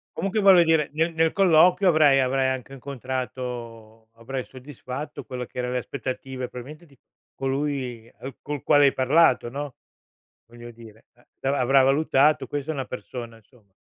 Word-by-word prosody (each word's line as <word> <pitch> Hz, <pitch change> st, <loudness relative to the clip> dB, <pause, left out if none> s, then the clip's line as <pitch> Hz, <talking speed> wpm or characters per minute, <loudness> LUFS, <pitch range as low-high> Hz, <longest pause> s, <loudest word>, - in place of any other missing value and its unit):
Comunque 200 Hz, +2 st, -1 dB
voglio 190 Hz, -3 st, +7 dB
dire 160 Hz, -2 st, +2 dB
nel 165 Hz, +2 st, 0 dB
nel 160 Hz, 0 st, +1 dB
colloquio 180 Hz, 0 st, +4 dB
avrai 150 Hz, -4 st, +5 dB
avrai 130 Hz, 0 st, +1 dB
anche 130 Hz, 0 st, -4 dB
incontrato 125 Hz, -4 st, -7 dB
avrai 125 Hz, +3 st, -6 dB
soddisfatto 130 Hz, +2 st, -8 dB
quello 125 Hz, -1 st, -6 dB
che -, -, -17 dB
era 125 Hz, 0 st, -2 dB
le 125 Hz, -, -1 dB
aspettative 130 Hz, 0 st, -6 dB
probabilmente 150 Hz, +7 st, -10 dB
di 140 Hz, -4 st, -23 dB, 0.4 s
colui 135 Hz, -4 st, -3 dB
al 135 Hz, 0 st, -8 dB
col 145 Hz, -2 st, -5 dB
quale 145 Hz, 0 st, +5 dB
hai 140 Hz, -, +3 dB
parlato, 130 Hz, -2 st, +3 dB
no, 140 Hz, +1 st, -6 dB, 0.7 s
voglio 120 Hz, 0 st, -12 dB
dire, 115 Hz, -1 st, -16 dB
eh. 120 Hz, -, -28 dB, 0.2 s
Avrà 140 Hz, +1 st, 0 dB
avrà 135 Hz, +2 st, +4 dB
valutato: 145 Hz, +2 st, +3 dB
"Questa 145 Hz, +1 st, -4 dB
è -, -, -3 dB
una 135 Hz, -2 st, -4 dB
persona, 120 Hz, -2 st, -8 dB
insomma, 110 Hz, -3 st, -26 dB
135 Hz, 160 wpm, -24 LUFS, 125-150 Hz, 0.7 s, voglio